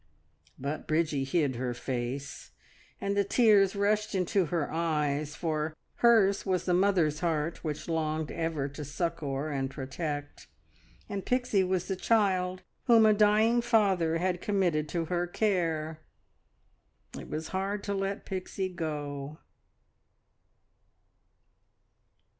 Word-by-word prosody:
But 140 +3 -4
Bridgie 155 -3 +1
hid 140 -3 0
her 125 -1 -2
face, 130 +3 -5 0.5
and 200 0 -1
the 200 - +3
tears 205 -2 +4
rushed 210 +1 +1
into 185 0 +1
her 160 -2 -2
eyes, 150 -2 0
for 155 -2 -2 0.2
hers 215 -5 +4
was 185 -3 0
the 180 - +2
mother's 175 -5 +2
heart 165 -1 -1
which 150 -2 -4
longed 155 -2 -1
ever 160 -4 -2
to 145 +2 -7
succour 150 -1 -3
and 135 -2 -1
protect, 145 +2 -5 0.6
and 200 -2 -4
Pixie 245 -6 +1
was 185 -1 -1
the 190 - -1
child 185 -3 +1 0.2
whom 230 -3 +6
a 215 - +6
dying 215 +3 +4
father 195 -9 +2
had 180 +1 -1
committed 175 -7 +1
to 170 0 -1
her 175 +1 -1
care. 165 -6 0 1.2
It - - -8
was 155 +1 -4
hard 195 +2 -2
to 200 - -2
let 195 0 -2
Pixie 190 0 -3
go. 150 -3 -4
170 Hz, 125 wpm, -29 LUFS, 150-195 Hz, 1.2 s, whom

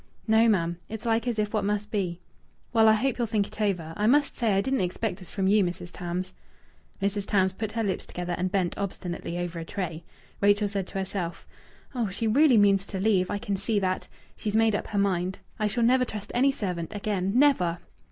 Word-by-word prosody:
"No, 225 +1 +5
ma'am! 170 -4 +1
It's 220 0 -6
like 230 +1 +1
as 235 -2 -1
if 210 0 -1
what 215 -2 +1
must 205 +1 -1
be." 180 -5 -1 0.5
"Well, 225 -1 +6
I 220 - +7
hope 250 +4 0
you'll 235 - +1
think 210 -2 +1
it 215 - -9
over. 175 -6 -1
I 210 +1 +1
must 285 +3 +3
say 225 -5 +1
I 195 - +3
didn't 265 +5 0
expect 185 +5 -2
this 185 - -11
from 195 - -2
you, 205 +1 +4
Mrs. 175 0 -4
Tams." 180 +1 -4 0.7
Mrs. 200 0 -1
Tams 190 -2 +2
put 215 +2 -4
her 225 0 -1
lips 195 -3 -2
together 175 0 -4
and 185 0 -2
bent 185 -3 0
obstinately 175 -3 -4
over 175 -1 -3
a - - -4
tray. 170 -3 -4 0.4
Rachel 205 +1 +4
said 195 -2 -3
to - - -6
herself: 190 -3 -4 0.5
"Oh, 235 -5 -1
she 200 +5 -3
really 255 +3 +5
means 200 -1 +4
to 195 - -4
leave! 190 -2 +2
I 205 - -1
can 200 -1 -2
see 205 +3 -1
that. 185 -2 -1 0.3
She's 210 -1 -3
made 225 -1 +4
up 205 - -2
her 210 - -3
mind.... 185 -2 +1 0.2
I 215 - +2
shall 235 +3 0
never 250 +2 +4
trust 210 -4 -6
any 270 +3 +4
servant 180 -7 -4
again 195 -2 -1
never!" 220 -12 +4
200 Hz, 220 wpm, -27 LUFS, 185-220 Hz, 0.7 s, I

